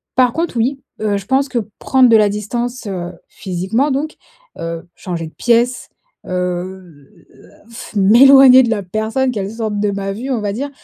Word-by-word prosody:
Par 250 Hz, -2 st, +3 dB
contre 330 Hz, -5 st, -3 dB
oui, 260 Hz, +4 st, -1 dB, 0.2 s
heu, 210 Hz, -2 st, 0 dB
je 200 Hz, -, -8 dB
pense 265 Hz, +4 st, +1 dB
que 245 Hz, -, -1 dB, 0.2 s
prendre 260 Hz, -2 st, +3 dB
de 225 Hz, -, +6 dB
la 210 Hz, -1 st, +4 dB
distance, 235 Hz, +4 st, -4 dB
heu, 180 Hz, -2 st, -5 dB
physiquement, 195 Hz, +10 st, -2 dB
donc 295 Hz, +4 st, -3 dB, 0.4 s
heu, 165 Hz, +1 st, -6 dB
changer 170 Hz, -3 st, -5 dB
de 155 Hz, -, -15 dB
pièce, 240 Hz, +1 st, 0 dB, 0.4 s
heu, -, -, -7 dB
heu, 180 Hz, -4 st, -7 dB
à -, -, -23 dB
ff 230 Hz, -1 st, -11 dB
m'éloigner 260 Hz, +6 st, +7 dB
de 240 Hz, -, -1 dB
la 215 Hz, -3 st, -1 dB
personne, 220 Hz, +7 st, -1 dB
qu'elle 200 Hz, -4 st, -4 dB
sorte 220 Hz, -2 st, -3 dB
de 205 Hz, 0 st, 0 dB
ma 195 Hz, 0 st, -4 dB
vue 240 Hz, +7 st, -6 dB
on 240 Hz, -4 st, -1 dB
va 205 Hz, -1 st, -2 dB
dire, 275 Hz, +7 st, -4 dB
220 Hz, 190 wpm, -17 LUFS, 190-255 Hz, 0.4 s, m'éloigner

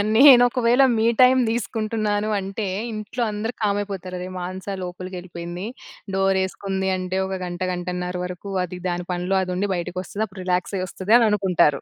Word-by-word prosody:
నేను 260 Hz, -1 st, +9 dB
ఒకవేళ 245 Hz, +2 st, +3 dB, 0.2 s
మీ 220 Hz, -, +2 dB, 0.2 s
టైం 255 Hz, +1 st, +7 dB
తీసుకుంటున్నాను 215 Hz, -2 st, -1 dB
అంటే 195 Hz, +2 st, -4 dB, 0.3 s
ఇంట్లో 215 Hz, +3 st, -5 dB
అందరు 220 Hz, +3 st, -3 dB
కామ్ 205 Hz, -1 st, +1 dB
అయిపోతారు. 190 Hz, -2 st, -6 dB
అరెరె! 180 Hz, -, -5 dB
మానస 185 Hz, +2 st, -5 dB
లోపలికెళ్ళిపోయింది. 180 Hz, 0 st, -6 dB, 0.5 s
డోరేసుకుంది 190 Hz, 0 st, 0 dB
అంటే 185 Hz, +1 st, -2 dB
ఒక 190 Hz, 0 st, -3 dB
గంట, 175 Hz, +1 st, -6 dB
గంటన్నర 180 Hz, 0 st, -3 dB
వరకు 180 Hz, +2 st, -7 dB
అది 180 Hz, 0 st, -8 dB
దాని 175 Hz, 0 st, -3 dB
పనిలో 180 Hz, +2 st, 0 dB
అది 185 Hz, -1 st, -3 dB
ఉండి 200 Hz, +2 st, -1 dB
బయటకి 175 Hz, +1 st, -4 dB
వస్తది. 205 Hz, +3 st, -4 dB
అప్పుడు 190 Hz, -1 st, -10 dB
రిలాక్స్‌ 180 Hz, +2 st, 0 dB
అయ్యి 185 Hz, 0 st, -2 dB
వస్తది 195 Hz, +5 st, -1 dB
అని 230 Hz, -2 st, +4 dB
అనుకుంటారు. 180 Hz, -8 st, +2 dB
190 Hz, 165 wpm, -23 LUFS, 180-210 Hz, 0.5 s, నేను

